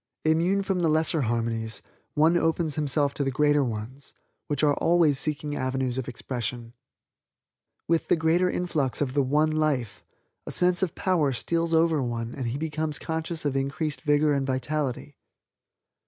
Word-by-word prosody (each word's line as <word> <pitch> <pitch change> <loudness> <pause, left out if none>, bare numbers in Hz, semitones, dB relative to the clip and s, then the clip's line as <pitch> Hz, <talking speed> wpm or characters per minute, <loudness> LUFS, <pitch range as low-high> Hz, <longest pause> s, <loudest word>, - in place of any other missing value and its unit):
Immune 170 +5 +2
from 190 -1 -1
the 170 -2 +2
lesser 160 0 +2
harmonies, 115 -2 -2 0.3
one 160 +3 +4
opens 165 -2 +1
himself 145 -1 +1
to 140 - -2
the 135 - 0
greater 145 +2 +3
ones, 120 +3 -6 0.3
which 145 -1 -1
are 145 -1 +5
always 165 -5 +3
seeking 150 -1 -2
avenues 130 -1 -1
of 130 - -5
expression. 120 -1 -5 1.1
With 165 0 +1
the - - +4
greater 165 +3 +2
influx 155 -8 -1
of 135 -3 -1
the 145 - +3
One 150 +4 +2
Life, 150 -8 -1 0.4
a - - -4
sense 180 0 +2
of 185 -4 -1
power 160 -8 +1
steals 165 +6 -1
over 160 -2 +3
one 115 -2 -3
and 130 -4 -4
he 120 +4 -2
becomes 155 0 -2
conscious 160 0 -4
of 140 -2 0
increased 140 +3 -2
vigor 150 -1 +3
and 135 -1 0
vitality. 135 +1 -2
145 Hz, 160 wpm, -26 LUFS, 130-160 Hz, 1.1 s, are